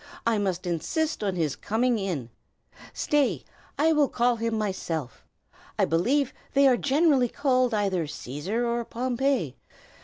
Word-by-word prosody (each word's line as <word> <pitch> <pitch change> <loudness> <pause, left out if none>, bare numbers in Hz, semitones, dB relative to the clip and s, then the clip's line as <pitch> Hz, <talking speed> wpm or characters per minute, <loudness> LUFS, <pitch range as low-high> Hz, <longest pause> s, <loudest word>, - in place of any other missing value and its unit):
I 225 -2 +2
must 185 -3 -2
insist 295 - -1
on 195 -3 -1
his 160 -5 -1
coming 235 +2 0
in. 160 - -3 0.6
Stay! 290 -3 +1 0.3
I 320 +2 +4
will 295 -3 +3
call 240 0 +1
him 225 0 -1
myself. 175 - -3 0.5
I - - +3
believe 250 - +1 0.2
they 275 0 +6
are 255 - +5
generally 275 -1 +3
called 255 -2 +1
either 195 -6 0
Cæsar 155 - -3
or 235 0 0
Pompey. 245 - -1
230 Hz, 140 wpm, -26 LUFS, 180-265 Hz, 0.6 s, they